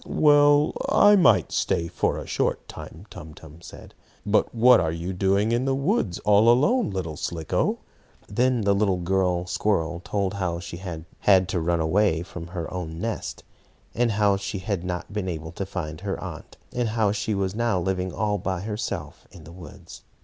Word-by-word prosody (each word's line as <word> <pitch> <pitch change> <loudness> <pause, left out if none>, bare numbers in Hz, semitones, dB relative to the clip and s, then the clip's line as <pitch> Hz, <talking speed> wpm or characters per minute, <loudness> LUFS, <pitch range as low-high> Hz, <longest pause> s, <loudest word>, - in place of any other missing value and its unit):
"Well, 145 -1 +4 0.2
I 205 0 +6
might 185 - +4
stay 85 - 0
a - - -1
short - - -2
time," 85 +6 -10
Tum 75 0 -10
Tum 80 +1 -14
said. - - -12 0.3
"But 105 +3 +1
what 125 +2 +6
are 80 -3 0
you 85 +3 -4
doing 100 +4 +1
in 120 +2 +1
the 135 0 +1
woods 140 - 0
all 105 +2 +5
alone, 185 - +3
little 90 -5 -4
Slicko?" 80 +2 -1 0.5
Then 125 +3 +1
the 100 -1 +2
little 100 -2 +1 0.5
squirrel 90 -3 0
girl 85 - -6
told 100 +1 -2
how 90 -4 -2
she 85 0 -8
had 85 -3 -7
had 95 -2 +4
to 90 - -1
run 85 +1 0
away 85 0 +1
from 90 -1 -9
her 85 -1 -6
own 80 -3 -5
nest, 115 +1 -4 0.5
and 120 -2 +1
how 100 -1 +2
she 100 +1 -5
had 95 -2 -3
not 90 +2 -5
been 105 -3 -3
able 80 -2 -5
to 95 +3 -5
find 80 -3 -5
her 100 -1 -3
aunt, 85 -5 -9 0.2
and 120 -2 -1
how 110 -2 +1
she 105 0 -2
was 95 -1 -1
now 115 -3 0
living 95 0 -2
all 105 0 -1
by 95 0 -3
herself 105 +1 -5
in 90 -4 -14
the 80 - -12
woods. 90 +1 -12
95 Hz, 185 wpm, -24 LUFS, 85-110 Hz, 0.5 s, I